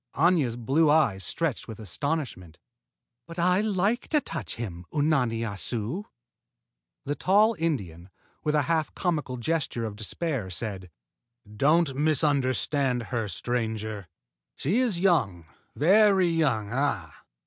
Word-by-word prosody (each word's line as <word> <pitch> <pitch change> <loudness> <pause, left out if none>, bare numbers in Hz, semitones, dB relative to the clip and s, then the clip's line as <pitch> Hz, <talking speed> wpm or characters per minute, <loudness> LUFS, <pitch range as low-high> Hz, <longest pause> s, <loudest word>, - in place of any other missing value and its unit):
Aña's 155 -6 +3
blue 135 +7 +2
eyes 115 -11 +3
stretched 165 -7 -2
with 110 -2 -8
astonishment. 110 - -4 0.7
"But 165 - -10
I 180 +3 +3
like 210 +3 0
to 305 - +3
touch 150 - -5
him, 90 -7 -6
Unani 135 -7 +1
Assu!" 115 - -2 1.0
The 145 - -1
tall 210 +8 +3
Indian, 95 - -3 0.3
with 150 -1 +1
a 150 - +3
half 160 +2 -1
comical 150 -8 -1
gesture 120 -2 -1
of 105 -2 -5
despair, 115 - -3
said: 95 -1 -5 0.7
"Don't 150 +4 +3
misunderstand 140 -3 +1
her, 115 -3 0
stranger. 110 -1 -3 0.5
She 185 - 0
is 235 -9 +1
young, 115 - +2 0.3
very 190 +2 +5
young, 135 -11 0
ah! 125 - -1
140 Hz, 120 wpm, -27 LUFS, 110-165 Hz, 1.0 s, very